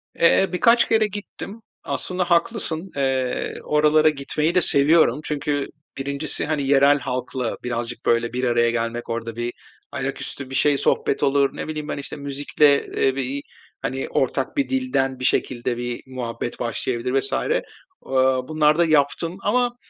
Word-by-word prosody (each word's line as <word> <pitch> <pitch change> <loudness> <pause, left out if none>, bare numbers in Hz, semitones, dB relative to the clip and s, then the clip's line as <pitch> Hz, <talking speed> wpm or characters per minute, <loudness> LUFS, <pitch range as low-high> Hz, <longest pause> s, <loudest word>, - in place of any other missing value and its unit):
Eee, 170 +3 +4
birkaç 235 +6 +4
kere 220 -1 +3
gittim. 205 +2 -8 0.2
Aslında 180 -1 -2
haklısın, 170 -1 +1
eee, 130 -2 -1
oralara 155 +1 +4
gitmeyi 150 +3 -1
de 180 - +5
seviyorum 145 -2 +4
çünkü 145 -2 -1 0.3
1'incisi 140 +2 -1
hani, 150 -1 -1
yerel 140 +1 +5
halkla 125 -1 -3
birazcık, 120 -1 -4
böyle, 115 0 +1
bir 125 +1 -2
araya 120 -1 +3
gelmek, 115 0 -3
orada 115 -1 -4
bir 120 +1 -3 0.4
ayaküstü 135 -2 -4
bir 135 - -5
şey 145 +1 +3
sohbet 135 - +1
olur, 140 0 +2
ne - - -4
bileyim 155 -1 -5
ben, - - -3
işte, 140 - -7
müzikle, 140 0 +2
eee, 135 -1 0
bir, 135 +1 -2 0.4
hani, 135 0 -3
ortak 135 - -1
bir 280 - +1
dilden 250 - 0
bir 130 - -3
şekilde 120 -1 0
bir 120 0 -4
muhabbet 120 -2 -5
başlayabilir 120 +2 -1
vs. 135 - -4
Aaa, 135 - -1
bunları 155 -1 +3
da 170 - +4
yaptım 160 +3 +1
ama 245 +3 +1
140 Hz, 150 wpm, -22 LUFS, 125-160 Hz, 0.4 s, de